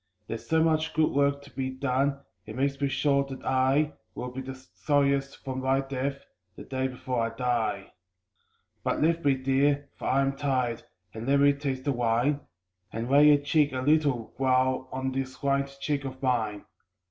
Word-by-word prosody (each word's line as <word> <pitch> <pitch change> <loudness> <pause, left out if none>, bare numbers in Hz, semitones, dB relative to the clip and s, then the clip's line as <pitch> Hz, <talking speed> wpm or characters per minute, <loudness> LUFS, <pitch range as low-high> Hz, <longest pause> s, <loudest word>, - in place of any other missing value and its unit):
There's 115 - -6
so 160 -1 +3
much 160 -1 +1
good 155 0 +3
work 140 0 +1
to 140 - -15
be 130 -1 -2
done 135 +1 0 0.3
it 110 - -7
makes 135 +1 -1
me 140 - +2
sure 140 0 +2
that 135 -1 -9
I 135 +3 +2 0.2
Will 125 - -5
be 130 +1 -5
the 130 0 -7
sorriest 140 +1 0
for 130 -1 -3
my 130 +1 +1
death, 135 +1 -4 0.3
the - - -9
day 130 0 -2
before 125 -1 -3
I 115 - 0
die. 115 -6 -1 0.9
But, - - 0
lift 165 +2 +2
me 140 -2 +4
dear, 140 +2 +1
for - - -5
I 135 +1 +3
am 135 0 -1
tired, 130 -5 -1 0.3
and 110 +2 -6
let 140 +1 +4
me 145 0 +5
taste 140 -2 -3
the 140 - +1
wine 120 +3 +1 0.5
And 115 +3 -4
lay 145 +2 +7
your 150 -1 +7
cheek 145 -1 +2
a 130 - -2
little 140 -5 +1
while 130 0 +1
on 130 0 -2
this 130 +1 -5
lined 140 0 +1
cheek 140 0 -1
of 130 -1 -6
mine. 115 -6 -1
135 Hz, 185 wpm, -27 LUFS, 130-140 Hz, 0.9 s, lay